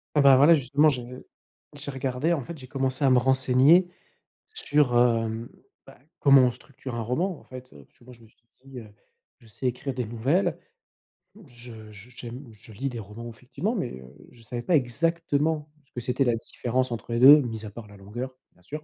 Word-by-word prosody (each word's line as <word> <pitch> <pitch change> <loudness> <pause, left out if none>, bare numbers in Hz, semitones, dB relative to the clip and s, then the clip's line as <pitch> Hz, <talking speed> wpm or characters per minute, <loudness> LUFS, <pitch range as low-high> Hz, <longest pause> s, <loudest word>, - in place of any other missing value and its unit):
Ah 150 - +4
bah, 135 -1 +7
voilà 145 +6 +7
justement 145 +1 +2
j'ai 125 -5 -2 0.7
j'ai 145 0 -7
regardé 130 +4 -1
en 155 -5 -1
fait, 170 +2 -9
j'ai 130 - -11
commencé 135 +1 -2
à 135 - +5
me 130 - +5
renseigner 130 +6 +4 0.7
sur, 145 - +2
hem, 115 -1 +1 0.4
bah - - -16 0.2
comment 140 -2 +6
on 125 -1 +3
structure 125 0 -10
un 115 - -3
roman 160 - -2
en - - -20
fait. 130 0 -11
Parce - - -19
que, - - -21
bon, 125 - -13
je 120 -2 -16
me - - -17
suis 110 - -31 0.2
dit, 135 -2 -10
heu, 110 -2 -12 0.5
je - - -23
sais 115 +4 -5
écrire 125 +2 -3
des 125 -1 -3
nouvelles, 125 - 0 0.9
je 120 -4 -13
j 105 +3 -13
j'aime 125 +3 -8
je 110 - -14
lis 135 +7 -3
des 125 - -7
romans 110 +2 -8
effectivement 130 - -4
mais, 135 - -3
heu, 65 0 -14 0.2
je 120 - -19
savais 120 +2 -6
pas 175 - +2
exactement 155 +2 0 0.2
ce - - -33
que 120 - -6
c'était 125 +3 0
la 120 -3 +1
différence 125 +2 -3
entre 120 0 -6
les 115 - 0
2 145 +4 +9
mis 115 -4 -5
à 105 - -7
part 110 +2 -10
la 105 -1 -15
longueur, 120 +7 -7 0.2
bien 90 - -27
sûr. 150 - -8
125 Hz, 210 wpm, -26 LUFS, 120-140 Hz, 0.9 s, 2